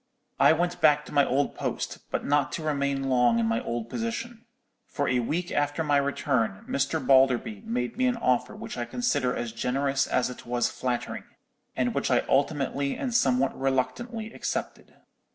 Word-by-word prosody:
I -, -, +7 dB
went 175 Hz, +2 st, -1 dB
back 150 Hz, -1 st, +4 dB
to -, -, -11 dB
my 145 Hz, -1 st, +5 dB
old 140 Hz, +2 st, 0 dB
post, -, -, -4 dB
but -, -, -2 dB
not 145 Hz, -1 st, +2 dB
to 160 Hz, -, -4 dB
remain 140 Hz, -2 st, 0 dB
long 125 Hz, -3 st, +3 dB
in 115 Hz, -, +2 dB
my 115 Hz, 0 st, 0 dB
old 115 Hz, -1 st, -3 dB
position; 230 Hz, -, -4 dB, 0.4 s
for 145 Hz, -, -2 dB
a 130 Hz, -1 st, +2 dB
week 165 Hz, +9 st, -2 dB
after 145 Hz, +2 st, 0 dB
my 145 Hz, -2 st, +3 dB
return 140 Hz, -7 st, 0 dB
Mr. 140 Hz, +4 st, 0 dB
Balderby 130 Hz, -6 st, +3 dB
made 125 Hz, -, -2 dB
me 255 Hz, 0 st, +2 dB
an 245 Hz, -1 st, +1 dB
offer 125 Hz, -, 0 dB
which -, -, -7 dB
I 120 Hz, -, -1 dB
considered 145 Hz, -, 0 dB
as 120 Hz, -1 st, -3 dB
generous 135 Hz, +4 st, 0 dB
as 125 Hz, 0 st, +1 dB
it -, -, -10 dB
was 120 Hz, 0 st, 0 dB
flattering, 125 Hz, -2 st, -3 dB, 0.5 s
and -, -, 0 dB
which -, -, -1 dB
I -, -, +2 dB
ultimately 140 Hz, 0 st, +1 dB
and 255 Hz, -3 st, -3 dB
somewhat 130 Hz, -, +2 dB
reluctantly 220 Hz, -, -2 dB
accepted. -, -, -4 dB
140 Hz, 175 wpm, -27 LUFS, 125-155 Hz, 0.5 s, I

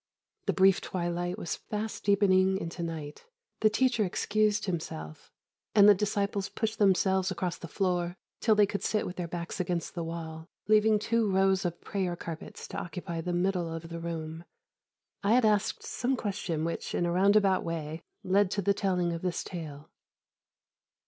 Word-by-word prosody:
The -, -, +3 dB
brief 190 Hz, 0 st, +5 dB
twilight 175 Hz, 0 st, -2 dB
was 165 Hz, -, -3 dB
fast 215 Hz, +1 st, -5 dB
deepening 190 Hz, -2 st, +4 dB
into 170 Hz, -1 st, -5 dB
night. 160 Hz, -, -6 dB, 0.3 s
The 215 Hz, -, +5 dB
teacher 240 Hz, 0 st, +2 dB
excused 210 Hz, +2 st, +1 dB
himself, 80 Hz, -, -5 dB, 0.4 s
and 205 Hz, -1 st, +8 dB
the 210 Hz, -, +10 dB
disciples 200 Hz, 0 st, -1 dB
pushed 220 Hz, -1 st, -3 dB
themselves 190 Hz, -1 st, +3 dB
across 180 Hz, -1 st, -3 dB
the 170 Hz, -, -7 dB
floor 175 Hz, 0 st, -1 dB, 0.2 s
till 220 Hz, -2 st, +4 dB
they 210 Hz, 0 st, +6 dB
could 200 Hz, 0 st, -3 dB
sit 215 Hz, -, 0 dB
with 180 Hz, -, -5 dB
their 175 Hz, -2 st, -3 dB
backs 170 Hz, +2 st, -5 dB
against 175 Hz, -2 st, -2 dB
the 170 Hz, -, -3 dB
wall, 165 Hz, -1 st, -6 dB, 0.2 s
leaving 215 Hz, 0 st, +5 dB
two 225 Hz, 0 st, +1 dB
rows 190 Hz, 0 st, +3 dB
of 175 Hz, -1 st, -2 dB
prayer 185 Hz, -3 st, -2 dB
carpets 165 Hz, -2 st, -7 dB
to 195 Hz, -, -4 dB
occupy 170 Hz, -1 st, -5 dB
the 180 Hz, -, -3 dB
middle 175 Hz, -1 st, 0 dB
of 165 Hz, 0 st, -6 dB
the 170 Hz, 0 st, -5 dB
room. 165 Hz, -1 st, -5 dB, 0.8 s
I 200 Hz, +2 st, +3 dB
had 250 Hz, -1 st, +5 dB
asked 215 Hz, 0 st, +1 dB
some 260 Hz, +2 st, -1 dB
question 190 Hz, -8 st, -2 dB
which, 170 Hz, -, -3 dB
in 175 Hz, -, +1 dB
a 170 Hz, -, 0 dB
roundabout 195 Hz, +1 st, +4 dB
way, 160 Hz, -1 st, -4 dB, 0.2 s
led 195 Hz, +1 st, +3 dB
to 200 Hz, -, -1 dB
the 200 Hz, -, +3 dB
telling 180 Hz, -3 st, 0 dB
of 165 Hz, -, -4 dB
this 180 Hz, -2 st, -2 dB
tale. 155 Hz, -5 st, -8 dB
185 Hz, 170 wpm, -29 LUFS, 170-205 Hz, 0.8 s, the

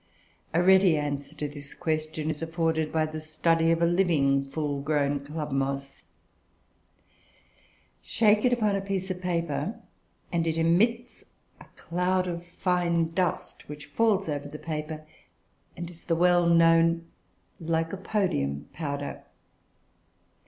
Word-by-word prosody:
A 175 Hz, +2 st, +2 dB
ready 190 Hz, -3 st, +6 dB
answer 145 Hz, 0 st, -3 dB
to 150 Hz, 0 st, -3 dB
this 145 Hz, -1 st, -9 dB
question 155 Hz, -1 st, -2 dB
is 150 Hz, -, -7 dB
afforded 165 Hz, -1 st, -1 dB
by 160 Hz, -1 st, +1 dB
the 155 Hz, 0 st, -6 dB
study 165 Hz, +1 st, +1 dB
of 165 Hz, 0 st, +2 dB
a -, -, +6 dB
living 160 Hz, -6 st, +2 dB
full 145 Hz, -1 st, -2 dB
grown 145 Hz, -1 st, +1 dB
club 150 Hz, +1 st, -5 dB
moss. 135 Hz, 0 st, -2 dB, 2.0 s
Shake 215 Hz, -2 st, +3 dB
it 250 Hz, -, +4 dB
upon 215 Hz, -4 st, +2 dB
a 195 Hz, -, -1 dB
piece 195 Hz, -1 st, -3 dB
of 180 Hz, 0 st, -5 dB
paper, 175 Hz, +4 st, -2 dB, 0.5 s
and 170 Hz, -1 st, 0 dB
it 160 Hz, 0 st, 0 dB
emits 225 Hz, +9 st, +1 dB, 0.3 s
a -, -, -13 dB
cloud 180 Hz, +2 st, 0 dB
of 170 Hz, -1 st, -4 dB
fine 175 Hz, -2 st, 0 dB
dust, 180 Hz, -4 st, -2 dB
which 150 Hz, 0 st, -8 dB
falls 210 Hz, -4 st, +2 dB
over 145 Hz, -2 st, -3 dB
the 150 Hz, -, -8 dB
paper, 155 Hz, 0 st, -5 dB, 0.7 s
and 170 Hz, 0 st, -5 dB
is 170 Hz, -1 st, -13 dB
the 165 Hz, -, 0 dB
well 175 Hz, 0 st, +4 dB
known 165 Hz, 0 st, +4 dB, 0.5 s
Lycopodium 165 Hz, -, -1 dB
powder. 145 Hz, -3 st, -4 dB
165 Hz, 130 wpm, -27 LUFS, 150-180 Hz, 2.0 s, ready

